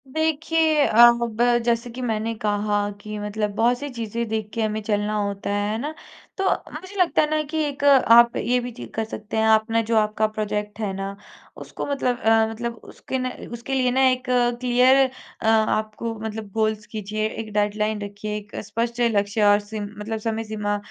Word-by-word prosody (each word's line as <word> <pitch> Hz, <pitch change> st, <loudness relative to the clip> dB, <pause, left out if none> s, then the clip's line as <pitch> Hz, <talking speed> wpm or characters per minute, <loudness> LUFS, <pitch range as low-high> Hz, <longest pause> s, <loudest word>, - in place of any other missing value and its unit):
देखिए, 315 Hz, +1 st, +1 dB
अ, -, -, -3 dB, 0.3 s
अब 230 Hz, -1 st, -3 dB, 0.2 s
जैसे 235 Hz, 0 st, 0 dB
कि 245 Hz, +2 st, -7 dB
मैंने 225 Hz, -2 st, -1 dB
कहा 205 Hz, -1 st, 0 dB
कि 215 Hz, 0 st, -6 dB
मतलब 210 Hz, 0 st, -2 dB
बहुत 240 Hz, +2 st, +2 dB
सी 290 Hz, +1 st, -5 dB
चीज़ें 235 Hz, -2 st, -4 dB
देख 220 Hz, -1 st, -2 dB
के 230 Hz, -, -2 dB
हमें 215 Hz, 0 st, -1 dB
चलना 210 Hz, 0 st, -1 dB
होता 200 Hz, -1 st, -3 dB
है, 205 Hz, 0 st, 0 dB
है 220 Hz, -, -1 dB
ना? 295 Hz, +5 st, -4 dB, 0.4 s
तो 385 Hz, -, -1 dB, 0.3 s
मुझे 375 Hz, +6 st, -9 dB
लगता 355 Hz, -, +3 dB
है 300 Hz, -, 0 dB
ना 310 Hz, 0 st, +1 dB
कि 320 Hz, -, -3 dB
एक 285 Hz, -1 st, -4 dB
आप 240 Hz, -4 st, +6 dB
ये 250 Hz, +1 st, +1 dB
भी 245 Hz, 0 st, -5 dB
चीज़ 240 Hz, -, -9 dB
कर 225 Hz, -, -2 dB
सकते 215 Hz, 0 st, -6 dB
हैं, 220 Hz, -, +2 dB
आप 220 Hz, +1 st, +4 dB
ना 230 Hz, 0 st, +3 dB
जो 230 Hz, -, +3 dB
आपका 215 Hz, 0 st, +2 dB
प्रोजेक्ट 210 Hz, -1 st, -4 dB
है 210 Hz, -3 st, -1 dB
ना, 195 Hz, +1 st, -5 dB, 0.4 s
उसको -, -, -6 dB
मतलब 260 Hz, -3 st, -1 dB
अ, 225 Hz, -1 st, +4 dB
मतलब 235 Hz, +1 st, -4 dB, 0.2 s
उसके 265 Hz, -, -5 dB
न 255 Hz, 0 st, -2 dB, 0.2 s
उसके 235 Hz, +3 st, -5 dB
लिए 255 Hz, -2 st, +2 dB
ना 260 Hz, +2 st, +2 dB
एक 255 Hz, 0 st, -1 dB, 0.4 s
क्लियर 250 Hz, +1 st, +4 dB, 0.4 s
अ, -, -, -5 dB
आपको 220 Hz, 0 st, +1 dB
मतलब 220 Hz, -1 st, -5 dB
गोल्स 215 Hz, 0 st, -1 dB
कीज़िए, 215 Hz, 0 st, -3 dB
एक 220 Hz, 0 st, -7 dB
डेडलाइन 210 Hz, +1 st, 0 dB
रखिए, 205 Hz, +1 st, -5 dB
एक 205 Hz, 0 st, -11 dB
स्पष्ट 230 Hz, +3 st, -3 dB, 0.2 s
लक्ष्य 205 Hz, +2 st, +1 dB
और 205 Hz, -, +4 dB
सीम 205 Hz, 0 st, -6 dB
मतलब 220 Hz, +1 st, -4 dB
समय 225 Hz, 0 st, -2 dB
सीमा 210 Hz, -1 st, -2 dB
220 Hz, 195 wpm, -23 LUFS, 210-245 Hz, 0.4 s, आप